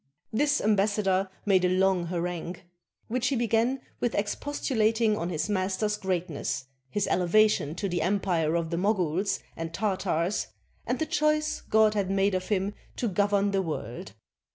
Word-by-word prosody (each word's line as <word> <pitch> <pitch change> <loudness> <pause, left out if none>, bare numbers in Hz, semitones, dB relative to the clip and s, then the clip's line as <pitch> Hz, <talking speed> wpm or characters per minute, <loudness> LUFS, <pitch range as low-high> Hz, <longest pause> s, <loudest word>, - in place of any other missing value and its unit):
This 290 +5 +2
ambassador 200 -2 +2 0.2
made 190 -3 +4
a 180 - +3
long 185 -1 +2
harangue, 175 0 -3
93 - - -19
CHINA 175 - -31 0.4
which 250 +2 0
he 270 - +1
began 235 +2 +1 0.2
with 240 - 0
expostulating 220 -1 +1
on 170 -3 -3
his 160 -1 -1
master's 205 +1 0
greatness, 180 -9 -2 0.2
his 205 +7 0
elevation 180 -4 +3
to 200 +3 -2
the 175 -2 -1
empire 175 -3 +1
of 170 -1 -1
the 170 - -1
Moguls 190 -1 0
and 165 0 -5
Tartars, 190 -3 0 0.4
and - - 0
the 315 - -1
choice 305 0 +1
God 220 -1 +5
had 200 -3 -1
made 195 0 +2
of 185 0 -2
him 200 -1 0 0.2
to 240 - -1
govern 205 0 +2
the 195 -1 +1
world. 125 - -5
195 Hz, 160 wpm, -28 LUFS, 180-215 Hz, 0.4 s, God